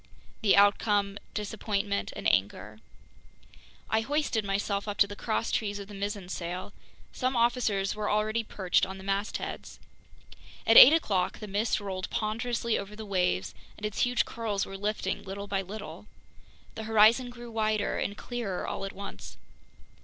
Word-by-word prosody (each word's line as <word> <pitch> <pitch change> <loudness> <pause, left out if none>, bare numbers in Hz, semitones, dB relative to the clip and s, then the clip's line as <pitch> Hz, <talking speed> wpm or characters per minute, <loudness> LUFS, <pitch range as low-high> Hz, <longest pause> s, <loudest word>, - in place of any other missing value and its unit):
The 210 -3 +5
outcome: 205 0 +3 0.2
disappointment 205 -1 -2
and - - -2
anger. 100 +2 0 1.1
I 220 - +2
hoisted 275 -3 0
myself 200 +1 -1
up 205 -1 -3
to - - +6
the 205 0 -8
crosstrees 215 -1 -1
of 200 -1 -8
the 205 - -11
mizzen 200 -1 -4
sail. 180 +2 -5 0.4
Some 255 0 -1
officers 230 -5 +1
were 210 0 -2
already 215 +2 +1
perched 190 -4 0
on 190 0 -2
the 190 - -10
mastheads. 195 +2 -3 0.9
At 225 - +5
eight 260 - +12
o'clock 200 - +1
the 215 - -7
mist 210 +3 0
rolled 190 -2 -4
ponderously 230 +1 -1
over 200 +1 -7
the 220 0 -7
waves, 180 - 0 0.2
and 210 - -6
its 210 - -3
huge 245 0 +2
curls 220 -4 -2
were 195 - -8
lifting 200 -1 -2
little 200 +1 -6
by 200 -1 -1
little. 195 -1 -8 0.7
The 220 - -6
horizon 225 +3 +5
grew 240 -1 -10
wider 215 -2 0
and 205 - -3
clearer 230 -7 -4
all - - -4
at 195 - -6
once. 200 +1 -9
205 Hz, 155 wpm, -29 LUFS, 195-220 Hz, 1.1 s, eight